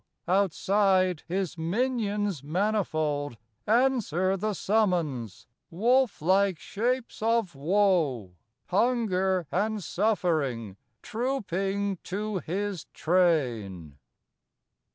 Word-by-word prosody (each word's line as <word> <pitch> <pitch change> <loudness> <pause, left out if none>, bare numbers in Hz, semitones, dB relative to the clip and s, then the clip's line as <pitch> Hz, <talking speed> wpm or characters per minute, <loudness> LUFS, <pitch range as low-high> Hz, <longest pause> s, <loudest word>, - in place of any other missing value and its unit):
outside, 190 -1 +2
his 180 -1 -2
minions 205 - -1
manifold 155 - -1 0.3
Answer 215 - +2
the 210 +2 -2
summons: 170 - 0 0.2
wolf 235 - +2
like 190 +1 +3
shapes 240 +7 -2
of 225 -5 +1
woe, 150 - +1 0.4
Hunger 190 -4 +1
and 210 +2 -1
suffering, 155 - 0 0.3
trooping 200 -5 -2
to 205 +1 -3
his 190 +1 -3
train. 120 - 0
190 Hz, 75 wpm, -27 LUFS, 160-210 Hz, 0.4 s, like